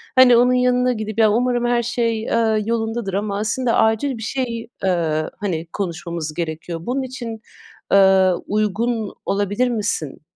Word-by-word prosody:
hani, 255 -2 +7
onun 250 +1 +4
yanına 250 0 +2
gidip, 215 -1 -5
ya, 215 -2 +5
umarım 240 +2 +1
her 240 0 +1
şey, 230 -1 -1
ııı, 220 -2 +2
yolundadır 225 -2 -2
ama, 200 0 -2
aslında, 230 +3 0
acil 225 +4 +1
bir 225 - -7
şey, 235 -3 -3 0.2
ııı, 160 -4 0
hani, 170 -5 -3
konuşmamız 170 -4 -4
gerekiyor. 165 +1 -4
Bunun 265 +2 -1
için, 240 -4 -6 0.5
ııı, 190 -2 +5
uygun 215 +1 -1
olabilir 205 +5 0
misin 205 - -2
220 Hz, 145 wpm, -20 LUFS, 195-240 Hz, 0.5 s, hani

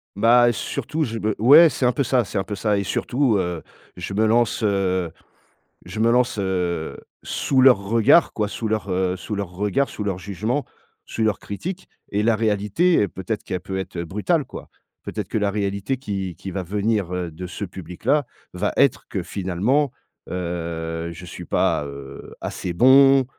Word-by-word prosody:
Bah 120 +4 +5
heu, 120 - +3
surtout, 155 +7 -3
je 115 -4 -3
be 110 0 -1
ouais, 145 +9 +8
c'est 130 -3 -1
un 125 - +4
peu 140 - 0
ça, 125 0 +2
c'est 105 - -5
un 95 - 0
peu 105 - -4
ça. 105 +1 +1
Et 100 - 0
surtout, 125 +4 +1
heu, 90 -3 -2 0.4
je 90 +2 -5
me 110 +3 +2
lance, 115 +1 +2
heu, 95 -4 +1 0.7
je - - -8
me 115 +1 +3
lance, 125 -2 +2
heu, 90 -4 -1 0.3
sous 135 - +1
leurs 130 -5 +7
regards 115 +10 +4
quoi, 105 - -1
sous 110 +2 -4
leurs, 110 -2 -1
heu, 90 0 0
sous 105 +3 -5
leurs 100 -3 -3
regards, 105 +9 0
sous 105 - -6
leurs 95 -3 -2
jugements, 110 +9 -2 0.4
sous 110 - -2
leurs 110 -1 0
critiques. 180 - -6 0.2
Et 105 +1 +1
la 115 0 +3
réalité 105 - +1
et 100 - +1
peut-être 105 +4 -4
qu'elle 90 - -3
peut 95 +2 -5
être, 95 - -6
heu, 85 - -2
brutale 105 - 0
quoi. - - -10 0.3
Peut-être - - -5
que - - -3
la 105 -1 +1
réalité 100 +4 -2
qui 95 - -4
qui 95 +1 -7
va 95 - -3
venir, 100 0 -1
heu, 90 -2 -3
de 90 +4 -7
ce 100 - -5
public-là, 95 - -1 0.3
va 95 +3 -1
être 140 - +2
que 95 -4 -3
finalement, 105 +12 0 0.4
heu, 85 -2 -4
je 85 +2 -10
suis 85 - -8
pas, - - +1
heu, 70 -1 -9
assez 90 - -4
bon 135 +6 +6
105 Hz, 190 wpm, -22 LUFS, 90-120 Hz, 0.7 s, ouais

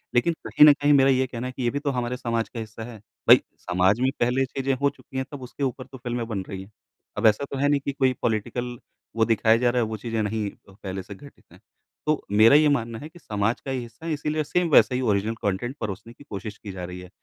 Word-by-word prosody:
लेकिन 170 +8 +3
कहीं 150 - +7
न 150 - +9
कहीं 145 0 +2
मेरा 135 -1 +5
ये 130 0 +3
कहना 125 0 -5
है 130 - -6
कि 130 - -5
ये 120 - +2
भी 140 +4 -2
तो 145 -1 -2
हमारे 125 -1 -2
समाज 115 -2 -2
का 115 - -7
हिस्सा 110 0 -7
है। 115 0 -9 0.3
भाई, - - +9 0.2
समाज 90 +5 +2
में 130 +1 +3
पहले 125 +2 +2
ये 135 - +3
चीज़ें 135 +1 -2
हो 140 - +4
चुकी 135 -1 -11
हैं, 130 - -1
तब 145 - -8
उसके 130 +3 -6
ऊपर 130 0 -2
फ़िल्में 120 -1 -3
बन 105 -4 -3
रही 95 -2 -5
हैं। 100 - -17 0.5
अब - - -1
ऐसा 110 +6 +3
तो 135 - -3
है 140 +1 +2
नहीं 145 -1 +3
कि - - 0
कोई 130 -2 +2
पॉलिटिकल 120 +2 -2 0.4
वो 115 - +3
दिखाया 115 0 +3
जा 125 0 +2
रहा 120 0 +1
है, 110 - 0
वो 110 - -4
चीज़ें 115 0 -2
नहीं 105 0 -2
अ, - - -22
पहले 95 -1 -4
से 100 - -10
घटित 140 +7 -15
हैं। - - -17 0.5
तो 155 0 +1
मेरा 110 +6 +7
ये 150 0 +6
मानना 115 -5 -1
है 150 - -8
कि 175 - -16
समाज 110 -3 -1
का 135 - -5
ये 130 - -1
हिस्सा 120 +6 -10
हैं, 165 - -1
इसीलिए 150 +1 -1
सेम 175 +4 0
वैसा 130 - +6
ही 130 - 0
ओरिजिनल 110 -1 +1
कॉन्टेंट 105 +6 -2
परोसने 110 +2 -5
की 145 - -16
कोशिश 105 -3 -7
की 100 - -8
जा 95 -1 -7
रही 90 0 -8
है 90 0 -11
120 Hz, 270 wpm, -25 LUFS, 110-135 Hz, 0.5 s, न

